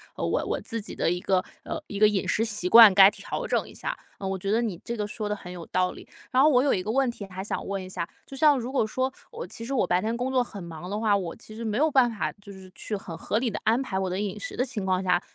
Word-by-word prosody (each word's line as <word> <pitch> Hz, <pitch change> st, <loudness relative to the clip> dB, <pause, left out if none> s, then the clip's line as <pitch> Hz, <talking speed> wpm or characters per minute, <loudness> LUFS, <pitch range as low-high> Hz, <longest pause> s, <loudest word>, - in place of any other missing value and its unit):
呃， -, -, -4 dB
我 -, -, 0 dB
我 -, -, -2 dB
自 230 Hz, -, -4 dB
己 210 Hz, -, -7 dB
的 -, -, 0 dB
一 175 Hz, +1 st, 0 dB
个 185 Hz, 0 st, +1 dB, 0.2 s
呃， -, -, -5 dB
一 205 Hz, -, -6 dB
个 215 Hz, +1 st, +6 dB
饮 210 Hz, -2 st, 0 dB
食 225 Hz, -, +1 dB
习 205 Hz, -5 st, -2 dB
惯， 225 Hz, -2 st, +10 dB
该 195 Hz, 0 st, +9 dB
调 -, -, -5 dB
整 -, -, 0 dB
一 -, -, -13 dB
下， -, -, -4 dB, 0.2 s
嗯， 195 Hz, -, -3 dB
我 190 Hz, -, -2 dB
觉 200 Hz, -, 0 dB
得 225 Hz, +2 st, +3 dB
你 210 Hz, -8 st, -3 dB
这 235 Hz, -, -4 dB
个 210 Hz, -, -1 dB
说 210 Hz, 0 st, -4 dB
得 210 Hz, -, 0 dB
很 180 Hz, -3 st, -10 dB
有 175 Hz, -2 st, -8 dB
道 185 Hz, 0 st, +1 dB
理。 -, -, -12 dB, 0.2 s
然 255 Hz, -, +4 dB
后 300 Hz, -, +7 dB
我 255 Hz, -3 st, +4 dB
有 285 Hz, -, +3 dB
一 185 Hz, -, 0 dB
个 210 Hz, -, -2 dB
问 265 Hz, +1 st, +2 dB
题 225 Hz, -4 st, -6 dB
还 190 Hz, 0 st, -7 dB
想 205 Hz, -, -4 dB
问 195 Hz, -1 st, -3 dB
一 -, -, -8 dB
下， 175 Hz, -2 st, -4 dB, 0.2 s
就 275 Hz, -, -10 dB
像 295 Hz, 0 st, +5 dB
如 245 Hz, +2 st, -5 dB
果 265 Hz, -5 st, +2 dB
说 260 Hz, +4 st, -1 dB, 0.2 s
我 475 Hz, +1 st, -6 dB
其 230 Hz, -, -9 dB
实 270 Hz, -, -4 dB
我 255 Hz, -, +2 dB
白 180 Hz, +1 st, +3 dB
天 225 Hz, +3 st, -1 dB
工 250 Hz, +2 st, -2 dB
作 255 Hz, -1 st, +3 dB
很 205 Hz, -4 st, -9 dB
忙 170 Hz, +1 st, -8 dB
的 205 Hz, +2 st, -2 dB
话， 215 Hz, -2 st, +3 dB
我 175 Hz, -4 st, -4 dB
其 215 Hz, -, -12 dB
实 230 Hz, -, -6 dB
没 215 Hz, -1 st, -1 dB
有 310 Hz, +4 st, +3 dB
办 255 Hz, -4 st, +4 dB
法 220 Hz, -, -2 dB
就 205 Hz, -1 st, -13 dB
是 190 Hz, -1 st, -13 dB
去 215 Hz, -, -4 dB
很 175 Hz, -4 st, -7 dB
合 205 Hz, -, -1 dB
理 245 Hz, 0 st, 0 dB
地 -, -, -4 dB
安 230 Hz, +4 st, +3 dB
排 215 Hz, -8 st, -3 dB
我 190 Hz, -1 st, -1 dB
的 185 Hz, +1 st, -2 dB
饮 210 Hz, 0 st, -3 dB
食 -, -, -5 dB
的 255 Hz, -, +2 dB
情 230 Hz, -7 st, -4 dB
况 185 Hz, 0 st, +1 dB
下， 180 Hz, -1 st, +2 dB
210 Hz, 340 characters per minute, -26 LUFS, 190-240 Hz, 0.2 s, 惯